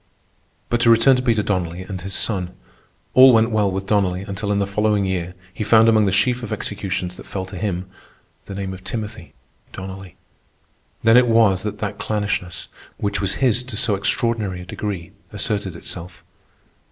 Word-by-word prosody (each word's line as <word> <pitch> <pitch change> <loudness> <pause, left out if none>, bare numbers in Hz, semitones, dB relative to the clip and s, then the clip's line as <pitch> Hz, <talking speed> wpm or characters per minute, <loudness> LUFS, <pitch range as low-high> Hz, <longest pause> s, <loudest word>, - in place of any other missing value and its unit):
But 120 0 +1
to 115 - +5
return 115 +4 +6
to - - -1
Peter 115 -4 +1
Donnelly 90 -3 -2
and 95 -1 -6
his 95 +1 -3
son. 90 -5 -2 0.6
All 130 0 +9
went 115 +1 +4
well 105 -2 +2
with 95 +1 -3
Donnelly 95 -3 +1
until, 100 +1 -3
in 100 - +1
the 100 - +1
following 105 0 +1
year, 90 -1 -3 0.2
he - - -3
found 110 +2 +5
among 110 -2 +4
the - - +2
sheaf 120 +6 +1
of 115 - -6
executions 95 -3 -3
that - - -11
fell 95 -1 -4
to 95 +1 -10
him 90 -2 -2 0.6
the 100 - -6
name 95 -1 -4
of 95 0 -11
Timothy 110 -3 -6 0.4
Donnelly. 95 -1 -8 0.9
Then 115 +1 +6
it 125 0 +5
was 110 -5 +4
that 105 0 -4
that 105 -1 -4
clannishness, 105 -4 -2 0.3
which 100 0 -2
was 100 -1 0
his 120 -1 +3
to 125 -3 -6
so 115 -2 +3
extraordinary 100 -1 0
a - - -9
degree, 95 -2 -5 0.2
asserted 100 -4 -2
itself. 85 0 -8
100 Hz, 180 wpm, -21 LUFS, 95-110 Hz, 0.9 s, All